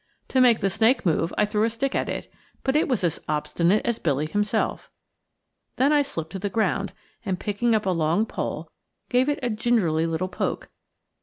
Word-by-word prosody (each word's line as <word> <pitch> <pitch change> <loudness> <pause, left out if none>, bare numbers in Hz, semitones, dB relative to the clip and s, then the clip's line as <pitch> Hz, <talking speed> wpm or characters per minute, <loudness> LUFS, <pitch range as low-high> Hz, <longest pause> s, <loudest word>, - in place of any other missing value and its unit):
To 260 - +3
make 240 -3 +5
the 195 - +2
snake 225 +6 +2
move, 165 0 +1
I - - +4
threw 210 0 0
a 225 - +3
stick 245 +4 -2
at - - -1
it, - - -4 0.4
but 265 +1 0
it 305 - +3
was 250 -8 0
as 170 -3 0
obstinate 170 +6 +1
as 235 -1 0
Billy 145 -2 0
himself. 205 +6 -1 0.9
Then 275 +4 +3
I 295 - +5
slipped 165 - -5
to 195 - -5
the 200 +2 -2
ground, 200 -1 0 0.3
and 185 -2 -2
picking 220 +3 +1
up 215 - 0
a 190 - +2
long 165 +4 +1
pole - - -4 0.4
gave 255 +3 +3
it 290 - 0
a 245 - 0
gingerly 215 -8 +1
little 165 +3 -1
poke. 180 - -3
210 Hz, 200 wpm, -25 LUFS, 175-240 Hz, 0.9 s, make